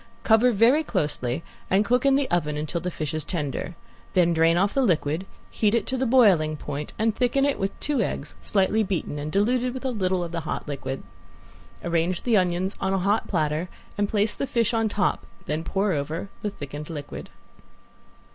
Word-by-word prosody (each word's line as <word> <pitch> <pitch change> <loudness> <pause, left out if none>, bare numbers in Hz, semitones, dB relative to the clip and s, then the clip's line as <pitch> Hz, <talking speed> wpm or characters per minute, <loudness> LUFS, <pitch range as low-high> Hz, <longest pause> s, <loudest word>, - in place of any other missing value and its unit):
Cover 225 +2 +5
very 240 +8 +4
closely 150 - -1 0.3
and 195 +3 +3
cook 250 +4 +2
in 270 - +5
the 275 -1 +1
oven 150 -4 0
until 155 +3 -2
the 180 - -2
fish 155 -4 -4
is 155 -1 -1
tender. 150 +1 -3 0.4
Then 175 -2 +4
drain 165 +1 +4
off 195 +3 +2
the 275 - +2
liquid, 170 - +1 0.2
heat 215 0 +2
it 235 - +1
to 260 - -2
the 260 0 0
boiling 190 -12 +4
point, 145 0 -5
and 220 0 +1
thicken 260 +2 +2
it 285 - 0
with 195 0 -2
two 295 -2 0
eggs - - -3
slightly 205 +2 +2
beaten 185 -7 -2
and 150 +1 -4
diluted 245 +6 +1
with 260 - -6
a 260 - +1
little 185 -5 0
of 170 - -5
the 170 - -2
hot 155 - -4
liquid. 135 -2 -4 0.8
Arrange 170 +1 0
the 235 -3 +3
onions 185 0 +1
on 190 0 +1
a - - +2
hot 200 +4 +1
platter 155 0 0 0.3
and 205 -1 0
place 210 0 +1
the 275 - -3
fish 235 -1 +1
on 225 -1 +2
top, 205 -2 0 0.2
then 155 +2 -2
pour 195 +4 0
over 160 +5 -3
the 210 - -1
thickened 145 -3 -7
liquid. 145 -3 -7
190 Hz, 195 wpm, -25 LUFS, 155-225 Hz, 0.8 s, Cover